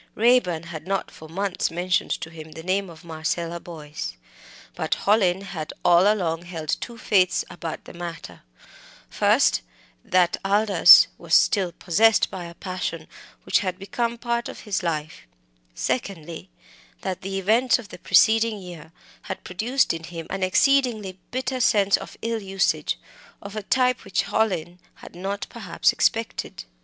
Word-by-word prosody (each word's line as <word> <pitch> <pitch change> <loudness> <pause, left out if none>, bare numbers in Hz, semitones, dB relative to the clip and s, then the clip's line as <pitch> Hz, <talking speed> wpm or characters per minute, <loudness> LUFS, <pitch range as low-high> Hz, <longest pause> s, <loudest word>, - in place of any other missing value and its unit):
Raeburn 220 -8 +3
had 165 0 -8
not 195 0 -2
for 155 - -13
months 195 +2 -1
mentioned 180 +2 0
to 160 - -6
him 160 -1 -10
the 160 - -9
name 190 +2 0
of 160 -2 -13
Marcella 165 +1 -3
Boyce, 155 - -7 0.6
but - - -1
Hallin 195 -3 +3
had 175 -6 -6
all 175 +4 +6
along 170 -6 -1
held 165 -3 -7
two 235 -1 -7
faiths 185 -5 +2
about 170 -2 -6
the - - -11
matter: 170 -1 -8 0.7
first, - - +3 0.4
that 180 -2 +2
Aldous 195 -3 +7
was 170 -1 +1
still 190 -4 +3
possessed 215 +7 +3
by 180 -2 -6
a 170 0 -10
passion 185 0 -4 0.4
which - - +2
had 185 -3 -3
become 235 +4 -2
part 235 0 -2
of - - -9
his 205 -4 -2
life; 155 - -4 0.5
secondly, 170 - -4 0.5
that 190 -2 -4
the 195 +1 -4
events 225 +6 +3
of 230 -5 -11
the - - -10
preceding 225 -1 +4
year 175 -4 -10 0.4
had - - -5
produced 230 +8 0
in 165 0 -6
him 165 -1 -7
an 195 - -3
exceedingly 215 -2 +2
bitter 255 +1 -2
sense 200 -4 +4
of - - -8
ill 230 -1 -1
usage, 195 0 0 0.4
of 200 +1 -9
a 215 - -3
type 250 +4 +1
which 195 - 0
Hallin 180 -5 -1 0.2
had - - -13
not 195 +3 -4
perhaps - - 0
expected. 225 - -1
185 Hz, 150 wpm, -24 LUFS, 170-215 Hz, 0.7 s, Aldous